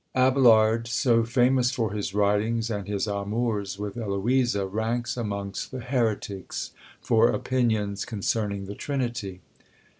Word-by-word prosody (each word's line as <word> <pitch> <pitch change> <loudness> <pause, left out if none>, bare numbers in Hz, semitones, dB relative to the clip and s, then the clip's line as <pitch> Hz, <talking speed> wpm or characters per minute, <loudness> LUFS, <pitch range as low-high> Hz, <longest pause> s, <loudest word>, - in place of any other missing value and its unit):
Abelard, 115 -4 +4
so 120 -1 +2
famous 125 +2 +3
for 115 -5 -1
his 105 -2 -3
writings 105 +3 +1
and 100 -3 -4
his 100 0 -1
amours 100 0 -2
with 105 +2 -5
Eloisa, 110 +1 +1
ranks 115 +4 -2
amongst 100 -4 -4
the 130 - -6
Heretics 115 -6 -2 0.3
for 115 0 +3
opinions 110 -6 0
concerning 100 -2 -2
the 100 - -6
Trinity! 120 -8 -3
110 Hz, 120 wpm, -26 LUFS, 100-120 Hz, 0.3 s, Abelard